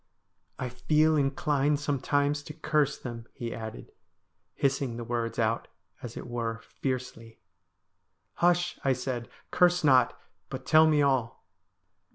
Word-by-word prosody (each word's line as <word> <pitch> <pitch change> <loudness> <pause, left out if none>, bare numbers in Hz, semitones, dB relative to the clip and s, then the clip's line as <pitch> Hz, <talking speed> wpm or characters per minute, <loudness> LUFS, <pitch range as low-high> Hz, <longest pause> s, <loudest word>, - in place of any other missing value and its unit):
' 90 +3 -47
I 130 - -3
feel 155 +6 +2
inclined 145 0 +1
sometimes 145 0 0
to 150 - -8
curse 155 -2 +1
them,' 120 -2 -7
he 115 -1 -4
added, 110 -1 -8 0.6
hissing 135 -3 0
the 120 - -4
words 115 -1 -2
out, 115 0 0 0.3
as 120 -2 -7
it - - -6
were, 115 -2 -3
fiercely. 125 -4 -5 0.5
' 90 0 -50
Hush,' 175 0 +2
I 135 - +3
said, 125 -1 -4
' - - -40
curse 175 -1 +4
not, 130 -4 +4 0.3
but - - -6
tell 160 0 +6
me 150 -2 +4
all.' 130 -5 0
135 Hz, 145 wpm, -28 LUFS, 115-150 Hz, 0.6 s, tell